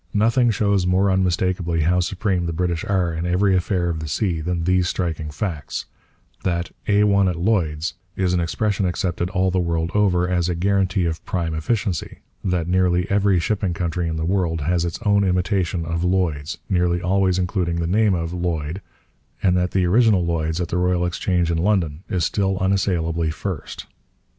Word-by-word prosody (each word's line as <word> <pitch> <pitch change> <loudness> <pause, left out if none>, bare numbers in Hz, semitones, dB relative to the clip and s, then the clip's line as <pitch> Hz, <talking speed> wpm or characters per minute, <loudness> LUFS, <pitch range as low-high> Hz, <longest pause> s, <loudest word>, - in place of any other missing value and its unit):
Nothing 115 +4 +3
shows 100 -3 +1
more 95 +2 +3
unmistakably 90 -2 0
how 90 +3 +2
supreme 90 -1 -1
the 85 - -2
British 85 0 -1
are 90 -4 0
in 80 +2 -3
every 95 +2 +2
affair 90 -1 0
of 85 -2 -2
the 80 - -5
sea 85 +1 -1
than 85 +1 -2
these 90 0 +2
striking 80 -4 -2
facts: 75 -1 -4 0.6
that 85 -2 -1 0.2
'A1 100 -2 +4
at 90 - -2
Lloyd's' 85 -4 0 0.2
is 90 -1 0
an 90 - +2
expression 95 +3 0
accepted 90 0 -2
all 95 -1 +1
the 95 - +1
world 85 -1 -1
over 90 -4 +2
as 90 -1 0
a 90 - -1
guarantee 95 +1 +1
of 80 -1 -3
prime 85 -3 -2
efficiency, 95 +1 -2 0.3
that 90 -3 0
nearly 90 0 +2
every 100 -1 +3
shipping 95 -1 -1
country 85 0 -2
in 80 - -2
the 80 0 -2
world 85 -3 0
has 85 +3 +1
its 85 - -3
own 100 -1 +4
imitation 90 -2 0
of 85 +1 -2
Lloyd's, 85 -4 0
nearly 90 -2 +1
always 95 +1 +1
including 90 -2 -1
the 85 0 -1
name 100 +3 +2
of 85 0 -3
Lloyd, 85 -1 -3 0.6
and 90 -2 +3
that 90 0 +1
the 95 0 +1
original 105 -1 +4
Lloyd's 80 -1 -1
at 90 - -2
the 90 - -1
Royal 90 0 +1
Exchange 90 -1 0
in 85 - 0
London 85 -5 0
is 90 -4 0
still 95 -1 0
unassailably 90 -4 0
first. 80 0 -5
90 Hz, 180 wpm, -22 LUFS, 85-95 Hz, 0.6 s, A1